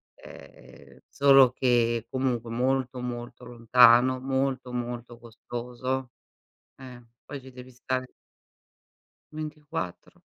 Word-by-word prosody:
Ehm, -, -, -15 dB
solo 135 Hz, -2 st, +5 dB
che 120 Hz, -3 st, +1 dB
comunque 125 Hz, -3 st, -2 dB
molto, 130 Hz, +1 st, -1 dB
molto 120 Hz, 0 st, -7 dB
lontano, 125 Hz, +1 st, +5 dB
molto 130 Hz, -1 st, -2 dB
molto 120 Hz, -1 st, -5 dB
costoso. 120 Hz, +2 st, -6 dB, 0.7 s
Eh, 125 Hz, -2 st, -12 dB, 0.2 s
poi 145 Hz, -, -8 dB
ci 130 Hz, 0 st, -13 dB
devi 125 Hz, 0 st, -12 dB
stare 130 Hz, +1 st, -4 dB, 1.2 s
24. 155 Hz, -, -7 dB
125 Hz, 95 wpm, -26 LUFS, 120-130 Hz, 1.2 s, solo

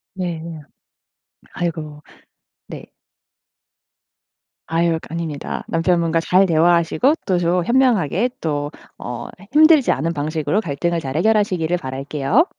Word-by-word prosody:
네. 175 Hz, -4 st, -4 dB, 1.1 s
아이고 175 Hz, -1 st, -1 dB, 1.0 s
네. -, -, -9 dB, 1.8 s
아유 165 Hz, +2 st, +1 dB
거 160 Hz, -, -2 dB
아닙니다. 160 Hz, -4 st, -4 dB
남편분과 165 Hz, -1 st, +1 dB
잘 185 Hz, +3 st, +3 dB
대화하시고 170 Hz, -, +3 dB
또 185 Hz, -3 st, +2 dB
조 175 Hz, 0 st, +1 dB
현명하게 235 Hz, -, +2 dB
또 145 Hz, -2 st, -2 dB, 0.3 s
어 120 Hz, -1 st, -6 dB, 0.3 s
힘들지 310 Hz, -2 st, +6 dB
않은 165 Hz, +5 st, -1 dB
방식으로 155 Hz, +5 st, -1 dB
갈등을 170 Hz, 0 st, -2 dB
잘 135 Hz, -2 st, -5 dB
해결하시기를 185 Hz, -3 st, +1 dB
바랄게요. 140 Hz, -, 0 dB
170 Hz, 255 characters per minute, -20 LUFS, 155-190 Hz, 1.8 s, 힘들지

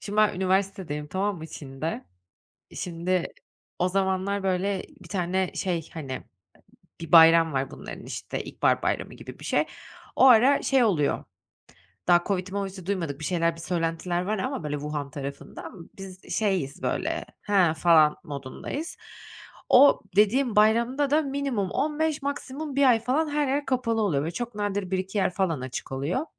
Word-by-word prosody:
Şimdi, 205 Hz, 0 st, -6 dB
ben 215 Hz, 0 st, +4 dB
üniversitedeyim, 185 Hz, -5 st, -1 dB
tamam 195 Hz, +5 st, -1 dB
mı 160 Hz, -1 st, -8 dB
Çin'de. 140 Hz, 0 st, -6 dB, 0.7 s
Şimdi, 180 Hz, +1 st, -1 dB, 0.5 s
o 180 Hz, +1 st, +2 dB
zamanlar, 195 Hz, +1 st, 0 dB
böyle, 190 Hz, +1 st, 0 dB, 0.2 s
bir 170 Hz, -, -14 dB
tane 185 Hz, 0 st, -1 dB
şey, 175 Hz, -4 st, -2 dB
hani, 135 Hz, -5 st, -6 dB, 0.8 s
bir 165 Hz, -, -7 dB
bayram 165 Hz, -1 st, +7 dB
var 135 Hz, 0 st, -1 dB
bunların, -, -, -9 dB
işte, -, -, -5 dB
ilkbahar -, -, +1 dB
bayramı -, -, -2 dB
gibi -, -, -11 dB
bir -, -, -9 dB
şey. -, -, +2 dB, 0.5 s
O -, -, +5 dB
ara 255 Hz, +3 st, +6 dB
şey 270 Hz, -2 st, +3 dB
oluyor, 170 Hz, -11 st, +1 dB, 0.8 s
daha 175 Hz, 0 st, +5 dB
COVID'i 185 Hz, -1 st, -2 dB
movidi 195 Hz, -2 st, -4 dB
duymadık, 170 Hz, -8 st, -2 dB
bir 155 Hz, -, -5 dB
şeyler, 170 Hz, -1 st, +1 dB
bir 165 Hz, -, -10 dB
söylentiler 170 Hz, 0 st, -1 dB
var 210 Hz, +4 st, -1 dB
ama 260 Hz, -, -3 dB
böyle, 150 Hz, -1 st, -2 dB
Wuhan 145 Hz, -1 st, -4 dB
tarafında. 140 Hz, 0 st, -7 dB, 0.3 s
Biz, 190 Hz, -1 st, -10 dB
şeyiz, 190 Hz, -10 st, -1 dB
böyle, -, -, -1 dB, 0.2 s
he, 190 Hz, -6 st, +3 dB
falan 160 Hz, -3 st, +5 dB
modundayız. 145 Hz, -, -6 dB, 0.7 s
O, 275 Hz, +3 st, +7 dB
dediğim 220 Hz, +4 st, +3 dB
bayramda 235 Hz, +6 st, +3 dB
da 305 Hz, +2 st, +4 dB
minimum 275 Hz, -8 st, -2 dB
15 310 Hz, +1 st, 0 dB
maksimum 285 Hz, +1 st, -4 dB
1 280 Hz, -, +3 dB
ay 235 Hz, -2 st, +5 dB
falan 270 Hz, +7 st, 0 dB
her 295 Hz, -1 st, 0 dB
yer 280 Hz, +2 st, 0 dB
kapalı 230 Hz, -3 st, 0 dB
oluyor 150 Hz, -9 st, +1 dB
ve 165 Hz, -, -3 dB
çok 240 Hz, +4 st, -5 dB
nadir 205 Hz, -2 st, -2 dB
1-2 190 Hz, +2 st, -2 dB
yer 195 Hz, -, +2 dB
falan 170 Hz, -8 st, 0 dB
açık 130 Hz, 0 st, -6 dB
oluyor. 145 Hz, -, -2 dB
190 Hz, 155 wpm, -26 LUFS, 165-230 Hz, 0.8 s, bayram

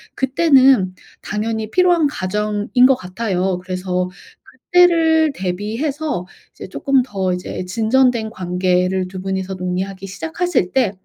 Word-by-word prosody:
그때는 265 Hz, -, +4 dB, 0.3 s
당연히 220 Hz, +1 st, -3 dB
필요한 355 Hz, -4 st, +3 dB
과정인 210 Hz, +2 st, 0 dB
것 270 Hz, -, +4 dB
같아요. 185 Hz, -2 st, -2 dB
그래서 180 Hz, -1 st, -2 dB, 0.6 s
그때를 325 Hz, -3 st, +4 dB
대비해서 225 Hz, -, -3 dB, 0.3 s
이제 -, -, -9 dB
쪼끔 275 Hz, -2 st, +1 dB
더 190 Hz, -6 st, -2 dB
이제 180 Hz, 0 st, -5 dB
진전된 230 Hz, +3 st, +1 dB
관계를 180 Hz, -1 st, 0 dB
2 185 Hz, 0 st, -8 dB
분이서 190 Hz, 0 st, -3 dB
논의하기 185 Hz, +1 st, -4 dB
시작하실 320 Hz, -, -2 dB
때 245 Hz, -7 st, +2 dB
210 Hz, 275 characters per minute, -19 LUFS, 185-270 Hz, 0.6 s, 그때는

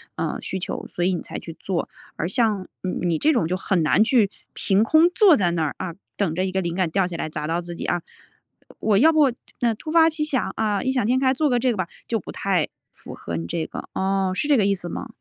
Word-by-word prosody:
呃， -, -, -2 dB
需 190 Hz, -, -4 dB
求， -, -, -4 dB
所 175 Hz, -, -2 dB
以 185 Hz, -, +2 dB
你 -, -, -4 dB
才 -, -, -7 dB
去 165 Hz, -1 st, -9 dB
做， 185 Hz, -3 st, -2 dB, 0.3 s
而 165 Hz, -, -1 dB
像， 205 Hz, -1 st, +1 dB, 0.2 s
嗯， 185 Hz, -, -2 dB
你 170 Hz, -2 st, +1 dB
这 305 Hz, -, +3 dB
种， 235 Hz, -, +1 dB
就 180 Hz, -, -1 dB
很 185 Hz, -1 st, 0 dB
难 165 Hz, +7 st, +4 dB
去 225 Hz, -4 st, +3 dB, 0.2 s
凭 195 Hz, +2 st, +2 dB
空 315 Hz, +8 st, +5 dB
坐 365 Hz, -2 st, +6 dB
在 175 Hz, -4 st, +2 dB
那 165 Hz, -2 st, 0 dB
儿， 150 Hz, -, -1 dB
啊， 170 Hz, -3 st, -4 dB, 0.2 s
等 180 Hz, -6 st, 0 dB
着 185 Hz, -, 0 dB
一 185 Hz, -, -2 dB
个 190 Hz, -, 0 dB
灵 170 Hz, -1 st, -3 dB
感 185 Hz, -2 st, +1 dB
掉 195 Hz, +1 st, +2 dB
下 175 Hz, -, -6 dB
来 155 Hz, -, -3 dB
砸 150 Hz, 0 st, -4 dB
到 170 Hz, +2 st, 0 dB
自 175 Hz, 0 st, -7 dB
己， -, -, -5 dB
啊。 175 Hz, -1 st, 0 dB, 0.8 s
我 210 Hz, -2 st, +2 dB
要 315 Hz, +8 st, +6 dB
不 300 Hz, -4 st, +4 dB, 0.3 s
那 235 Hz, -1 st, +3 dB
突 220 Hz, -, -9 dB
发 325 Hz, 0 st, +6 dB
奇 315 Hz, -1 st, -2 dB
想， 275 Hz, -4 st, -1 dB
啊， 210 Hz, -3 st, 0 dB
异 260 Hz, -, +1 dB
想 255 Hz, -5 st, 0 dB
天 250 Hz, +2 st, +3 dB
开， 260 Hz, -1 st, +3 dB
做 300 Hz, +2 st, +1 dB
个 245 Hz, -, +2 dB
这 250 Hz, +1 st, +2 dB
个 225 Hz, -, -3 dB
吧， 185 Hz, -2 st, -1 dB, 0.2 s
就 225 Hz, -2 st, 0 dB
不 -, -, -9 dB
太 185 Hz, -6 st, 0 dB, 0.3 s
符 -, -, -11 dB
合 85 Hz, -, -6 dB
你 85 Hz, +1 st, -4 dB
这 160 Hz, -, -2 dB
个， -, -, -8 dB
哦， 190 Hz, 0 st, 0 dB
是 290 Hz, -, -1 dB
这 290 Hz, -, +5 dB
个 205 Hz, -, +3 dB
意 200 Hz, -, +2 dB
思 175 Hz, -2 st, -7 dB
吗？ -, -, -5 dB
195 Hz, 290 characters per minute, -23 LUFS, 175-250 Hz, 0.8 s, 坐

